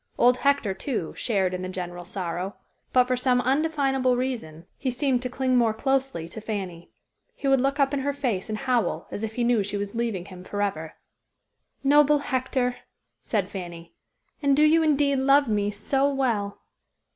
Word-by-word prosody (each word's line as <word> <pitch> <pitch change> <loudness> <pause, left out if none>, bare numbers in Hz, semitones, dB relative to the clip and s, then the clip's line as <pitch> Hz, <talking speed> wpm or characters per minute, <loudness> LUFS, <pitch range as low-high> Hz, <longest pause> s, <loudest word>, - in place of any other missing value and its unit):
Old 250 +1 +5
Hector, 280 -8 +1
too, 190 - -3
shared 190 -5 0
in 180 - -3
the 185 - -4
general 175 -1 -6
sorrow, 180 +1 -4 0.4
but 255 - +5
for 255 0 0
some 250 0 +2
undefinable 270 -1 +1
reason 225 -11 -4
he 265 - -1
seemed 255 0 0
to 250 - -3
cling 255 0 0
more 230 -3 +3
closely 270 - 0
to 215 - -7
Fanny. 190 -6 -5 0.5
He 280 - -4
would 270 -1 +4
look 275 +2 0
up 275 0 +3
in 285 - +1
her 280 +1 0
face 245 -9 -2
and 215 - -2
howl, 250 -2 0
as - - -5
if 220 0 -3
he 245 - 0
knew 235 -2 +3
she 205 +1 -3
was 200 0 -4
leaving 230 -6 -2
him 185 -2 -11
forever. 190 -6 -3 0.9
"Noble 295 +1 +5
Hector!" 255 -2 -1 0.4
said 205 -5 -1
Fanny, 175 -4 -8 0.5
"and 280 -1 +3
do 300 - +5
you 320 +2 +5
indeed 290 -3 +2
love 275 +1 +4
me 205 -2 +1
so 270 +7 0
well?" 230 -7 -1
245 Hz, 180 wpm, -25 LUFS, 200-270 Hz, 0.9 s, Old